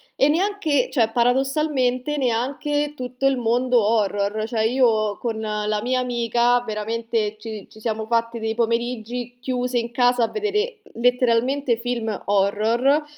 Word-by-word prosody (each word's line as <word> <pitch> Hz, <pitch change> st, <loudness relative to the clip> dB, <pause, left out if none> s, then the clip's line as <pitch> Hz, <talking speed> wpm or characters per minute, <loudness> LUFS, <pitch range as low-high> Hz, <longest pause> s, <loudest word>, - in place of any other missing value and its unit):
e 275 Hz, -, +4 dB
neanche 330 Hz, -5 st, +1 dB
cioè, 230 Hz, -5 st, +2 dB
paradossalmente 265 Hz, +2 st, +1 dB
neanche 285 Hz, +4 st, -1 dB
tutto 250 Hz, 0 st, -4 dB
il 270 Hz, -1 st, +3 dB
mondo 245 Hz, 0 st, +2 dB
horror, 205 Hz, -1 st, 0 dB
cioè 225 Hz, -2 st, -1 dB
io 225 Hz, -4 st, +2 dB
con 225 Hz, -2 st, -3 dB
la 210 Hz, -1 st, -1 dB
mia 255 Hz, +2 st, 0 dB
amica 240 Hz, 0 st, +1 dB
veramente 220 Hz, 0 st, -2 dB
ci 215 Hz, -2 st, -8 dB
ci 215 Hz, -, -15 dB
siamo 220 Hz, -1 st, -2 dB
fatti 230 Hz, 0 st, 0 dB
dei 220 Hz, 0 st, -2 dB
pomeriggi 240 Hz, +1 st, -2 dB
chiuse 250 Hz, -1 st, -1 dB
in 235 Hz, 0 st, -4 dB
casa 245 Hz, 0 st, +3 dB
a 225 Hz, -, +3 dB
vedere 430 Hz, +2 st, -1 dB, 0.2 s
letteralmente 245 Hz, +1 st, +2 dB
film 235 Hz, -2 st, -3 dB, 0.2 s
horror 220 Hz, +9 st, +2 dB
240 Hz, 135 wpm, -22 LUFS, 225-255 Hz, 0.2 s, e